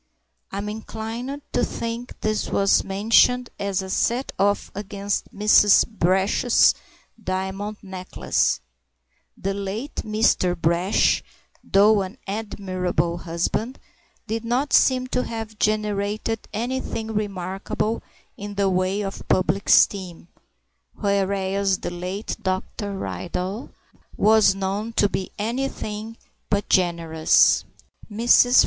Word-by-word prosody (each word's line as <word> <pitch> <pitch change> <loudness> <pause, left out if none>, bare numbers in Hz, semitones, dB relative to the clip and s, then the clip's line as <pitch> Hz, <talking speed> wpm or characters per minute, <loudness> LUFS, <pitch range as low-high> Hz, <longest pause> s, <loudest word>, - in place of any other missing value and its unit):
I'm 200 +1 -4
inclined 225 +6 -5
to 245 - +2
think 235 +1 -4
this 215 -1 -1
was 195 0 +3
mentioned 225 +5 +3
as 200 -1 -1
a 190 - -7
set 245 +6 0
off 200 +1 +1
against 200 0 -3
Mrs. 210 0 +5
Brash's 195 +3 +3 0.5
diamond 190 +3 -3
necklace; 190 -1 -1 0.8
the 195 +1 -2
late 200 +7 -5
Mr. 215 -5 +1
Brash, 170 +4 +2 0.4
though 205 +1 +4
an 190 +1 -6
admirable 185 -5 -2
husband, 175 +9 -2 0.5
did 225 +1 -3
not 250 +5 -1
seem 255 -1 +4
to 255 - -1
have 220 -2 -6
generated 215 +1 -1
anything 225 -1 -3
remarkable 200 +1 -2 0.3
in 205 0 -7
the 195 -1 +2
way 185 +2 0
of 195 -1 -6
public 185 +2 +1
esteem, 180 -4 +3 0.7
whereas 195 -1 0
the - - -5
late 180 +4 -4
Dr. 195 +1 -3
Ridley 190 +5 -4 0.5
was 215 -1 +5
known 200 +4 -3
to 205 - +3
be 190 -1 -4
anything 225 -1 -3 0.3
but 200 -1 0
generous. 165 -3 +3 0.5
Mrs. 240 +3 +5
200 Hz, 105 wpm, -23 LUFS, 190-220 Hz, 0.8 s, Mrs